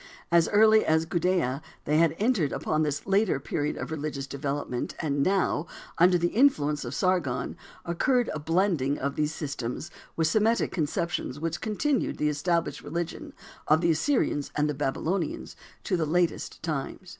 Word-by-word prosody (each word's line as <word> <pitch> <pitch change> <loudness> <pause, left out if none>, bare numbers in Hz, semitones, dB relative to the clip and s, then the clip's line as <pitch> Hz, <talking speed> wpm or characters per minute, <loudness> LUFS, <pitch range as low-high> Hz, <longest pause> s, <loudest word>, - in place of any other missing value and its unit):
As 170 -1 +4
early 220 +1 +6
as 160 +1 +2
Gudea 170 -6 0 0.2
they 150 +2 +2
had 165 -1 +3
entered 210 - +1
upon 155 0 -1
this 150 -2 -1
later 195 -5 +2
period 145 +2 -2
of - - -5
religious 150 -3 -3
development, 140 -2 -3
and 145 -3 -1
now, 185 -1 +1 0.3
under 180 +1 +6
the 175 0 +1
influence 150 - +2
of 120 +1 -5
Sargon 180 -9 0 0.3
occurred 245 - +1
a 155 - -3
blending 165 -3 +1
of 140 +1 -2
these 150 0 0
systems 145 0 -5 0.2
with 165 - +1
Semitic 215 +7 +2
conceptions 160 -3 -2
which 165 +1 -3
continued 260 +6 0
the 150 - +1
established 170 +3 -1
religion 170 +3 -5 0.3
of 155 +2 +4
the 170 -1 +3
Assyrians 160 - 0
and 150 0 +1
Babylonians 155 +5 -2 0.3
to - - 0
the 160 -3 0
latest 170 0 -1
times. 160 +4 -4
160 Hz, 155 wpm, -27 LUFS, 145-185 Hz, 0.3 s, early